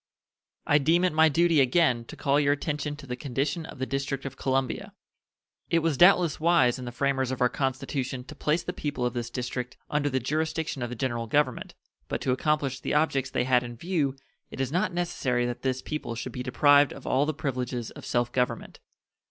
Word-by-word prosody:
I 145 - +4
deem 165 +5 +3
it 185 - +2
my 160 0 +5
duty 165 0 +4
again 130 -3 +3
to - - -10
call 140 +1 +2
your 145 -1 +3
attention 150 0 -3
to 145 -1 -12
the 125 -2 -4
condition 140 +5 -2
of - - -10
the 130 - -2
District 135 0 -3
of 135 -1 -5
Columbia. 130 -2 -1 0.8
It 165 -1 +2
was 165 -3 +1
doubtless 175 0 +5
wise 155 -7 +3
in 125 - -6
the 120 - -5
framers 135 0 0
of 130 - -3
our 125 - +4
Constitution 135 -1 -2
to - - -10
place 155 +3 0
the - - -4
people 145 -4 -3
of 120 - -1
this 120 -2 -3
District 125 0 -4
under 145 -1 +1
the 130 -1 0
jurisdiction 155 +2 -2
of 120 - -2
the 125 - -5
General 120 -1 -2
Government, 130 +1 0 0.3
but - - -2
to 130 - 0
accomplish 135 0 0
the - - -2
objects 140 -4 +1
they 125 - 0
had 125 -1 +3
in 120 -1 -7
view 150 -1 -1 0.3
it - - -9
is 135 -1 -1
not 180 +3 +1
necessary 135 -8 -1
that 120 0 -4
this 130 -1 -1
people 150 -6 -4
should 120 +2 -5
be 125 - -5
deprived 145 +2 +4
of - - -12
all 140 +3 +2
the - - +2
privileges 125 -5 -3
of - - -11
self 120 -1 0
government. 125 -1 -2
135 Hz, 210 wpm, -27 LUFS, 125-150 Hz, 0.8 s, my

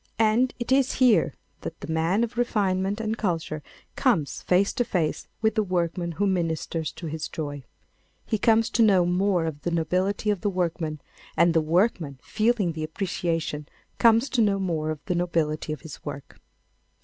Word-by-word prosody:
And 225 +3 +3
it 240 0 -4
is 265 -1 +3
here 220 - +3 0.3
that 165 - -7
the - - -6
man 170 +7 +2
of 235 +1 -3
refinement 200 -4 0
and 220 0 -1
culture 165 -6 -2 0.3
comes 150 -4 +1
face 185 +2 +2
to 245 - +1
face 170 -9 -1 0.2
with 220 - +3
the 215 - +2
workman 175 -3 -1
who 205 +6 0
ministers 165 -3 -1
to 175 - -8
his 155 0 -4
joy. 145 -3 -5 0.6
He 220 - -1
comes 225 +1 +3
to 235 - +2
know 195 -5 +5
more 180 -1 +1
of 150 -2 -4
the - - -1
nobility 180 +5 0
of 205 - -2
the 205 - +1
workman, 165 -5 -2 0.4
and 170 0 +5
the 165 - +4
workman, 160 - +1
feeling 215 -5 +1
the 155 -1 -5
appreciation, 165 -3 -2 0.3
comes 230 +3 +5
to 245 - +2
know 205 -2 +3
more 165 -5 -1
of 155 -2 -5
the - - 0
nobility 165 -3 -1
of 155 - -5
his 160 -4 -10
work. 140 -2 -8
180 Hz, 175 wpm, -26 LUFS, 160-210 Hz, 0.6 s, know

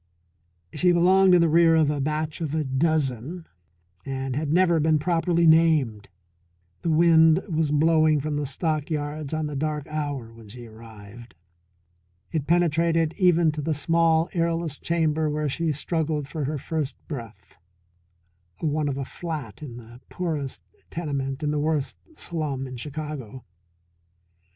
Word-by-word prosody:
She 175 +4 +3
belonged 185 +2 +5
in 175 - +5
the 170 - +4
rear 165 +1 +5
of 155 -2 +3
a 145 -2 -2
batch 155 +3 -2
of 155 -2 -2
a 155 - 0
dozen, 145 +2 -1 0.6
and 135 -1 -4
had 150 0 -2
never 170 -1 +3
been 155 0 +3
properly 170 +2 +1
named. 155 -10 +3 0.7
The 170 - -1
wind 160 0 +5
was 160 -4 0
blowing 155 0 +3
from 150 +1 -3
the 145 -1 -2
stockyards 150 0 -3
on 155 -1 -1
the 150 -1 -5
dark 150 0 -2
hour 145 -6 -4
when 115 -1 -14
she 120 +3 -11
arrived. 110 0 -13 1.0
It 155 -3 -2
penetrated 165 -1 +2
even 175 -3 +4
to 150 0 -5
the 155 +1 -1
small 165 +2 +2
airless 165 -2 -1
chamber 160 -2 0
where 150 0 -1
she 160 +3 -1
struggled 155 -1 -2
for 150 +1 -4
her 150 +2 -2
first 150 0 -3
breath 115 - -9 1.0
one 155 -1 -1
of 140 -1 -2
a 135 - -3
"flat" 150 - -6
in 125 -6 -8
the 120 +1 -13
poorest 155 -7 -4 0.3
tenement 140 -3 -4
in 150 - 0
the 150 - 0
worst 150 -2 -1 0.2
slum 150 - -4
in 130 -1 -7
Chicago. 140 -2 -7
155 Hz, 145 wpm, -25 LUFS, 135-165 Hz, 1.0 s, belonged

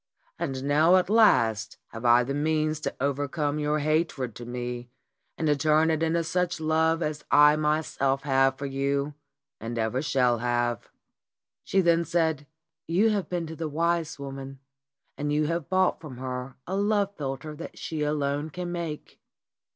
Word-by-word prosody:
And 135 -1 -3
now 155 +5 +4
at 185 +1 +2
last 115 - +3
have 115 +1 -8
I 120 +1 +6
the 135 +3 -3
means 155 +1 0
to 140 -2 -4
overcome 145 +2 -1
your 150 0 +1
hatred 155 -5 0
to 120 +2 -9
me, 120 0 -5 0.5
and 160 - -2
to 150 -1 +3
turn 155 +2 +3
it 160 0 0
into 165 +1 +1
such 175 +1 -1
love 160 +1 +1
as 150 -1 -3
I 150 +1 +7
myself 150 -3 0
have 135 -1 +2
for 140 - -5
you 140 +1 -1 0.5
and 115 +2 -5
ever 115 +3 0
shall 125 -5 +2
have." 120 -1 -1 0.7
She 195 - +2
then 170 -1 +3
said: 160 -4 0 0.4
"You 200 +7 +3
have 205 -3 -1
been 175 -2 -2
to 160 0 -7
the 160 -1 -4
wise 165 +1 0
woman, 135 -1 -7 0.6
and 145 0 -1
you 150 +1 +2
have 170 0 -2
bought 185 -2 +2
from 145 -6 -9
her 125 0 -5
a 190 - -3
love 205 0 +1
philter 145 +1 -5
that 165 - -9
she 160 -2 -4
alone 145 0 -1
can 175 +2 -5
make." 170 -4 -6
150 Hz, 165 wpm, -27 LUFS, 135-165 Hz, 0.7 s, I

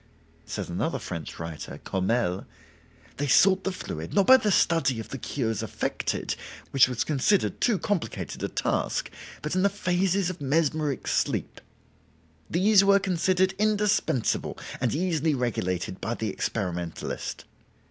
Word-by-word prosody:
Says - - -4
another - - -1
French 85 -3 -6
writer 80 -3 -6
(Courmelles): 95 -1 0 0.7
"They 145 - -1
sought 190 +6 +5
the 195 - +1
fluid, 80 - -6
not 200 - +5
by 260 +4 +9
the 215 -5 0
study 140 -9 +2
of 110 - -7
the 135 - -6
cures 115 -7 -2
affected, - - -2 0.4
which 135 -2 +5
was 120 -1 -1
considered 155 +7 +1
too 235 -5 +3
complicated 200 -2 -3
a - - 0
task, - - -1 0.3
but 150 - -2
in 185 - +2
the 200 - +4
phases 185 -1 +1
of 170 -3 -11
mesmeric 150 -1 0
sleep. - - -1 0.9
These 195 +3 +5
were 200 0 +6
considered 190 0 +1
indispensable 210 - +1 0.2
and 125 -2 +1
easily 160 -3 +1
regulated 95 -7 -2
by 120 - -2
the 110 -2 -2
experimentalist. 90 -7 -4
155 Hz, 135 wpm, -27 LUFS, 115-190 Hz, 0.9 s, by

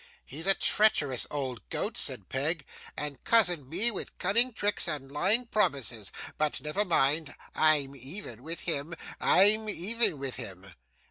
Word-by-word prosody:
'He's 160 +7 -3
a 195 - +6
treacherous 150 - +2
old 130 -5 -6
goat,' - - -3
said 95 - +2
Peg, 145 +3 -1 0.3
'and 145 -3 -5
cozened 175 - +2
me 205 +10 +4
with 200 - -8
cunning 230 +7 +3
tricks 205 -4 -1
and 145 -4 -5
lying 195 +11 +2
promises, 140 - -1 0.3
but 155 -1 -1
never 150 +9 -2
mind. 150 -4 +1 0.2
I'm 145 -3 +2
even 135 - -8
with 165 +4 -7
him. 165 0 -3 0.2
I'm 215 +3 +4
even 210 -1 0
with 135 -2 -6
him. 95 -6 -8
155 Hz, 145 wpm, -28 LUFS, 135-200 Hz, 0.3 s, a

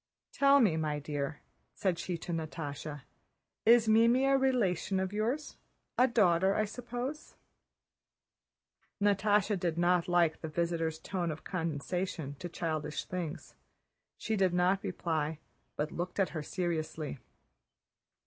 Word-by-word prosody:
"Tell 280 0 +5
me, 200 -11 +4
my 155 -2 -1
dear," 145 0 -4 0.3
said 180 -4 0
she 175 0 -3
to 170 - -6
Natásha, 150 -3 -5 0.6
"is 230 -1 +7
Mimi 230 +4 +5
a 275 0 +4
relation 210 -8 +1
of 190 +1 -2
yours? 240 +8 -2 0.4
A 250 - +5
daughter, 190 -5 +3
I 215 - +2
suppose?" 245 +6 -6 1.6
Natásha 205 0 +2
did 170 -2 -1
not 175 0 +3
like 175 -2 +2
the 160 - -4
visitor's 165 0 -1
tone 175 +1 -3
of 155 -1 -5
condescension 165 -2 -3
to 175 - -5
childish 160 -3 -3
things. 175 -3 -5 0.6
She 220 - -1
did 190 -3 +2
not 185 +2 +3
reply, 160 -5 -2 0.4
but 150 +1 -2
looked 180 +3 -4
at 195 - +3
her 160 - -4
seriously. 160 -4 -3
180 Hz, 130 wpm, -32 LUFS, 160-210 Hz, 1.6 s, is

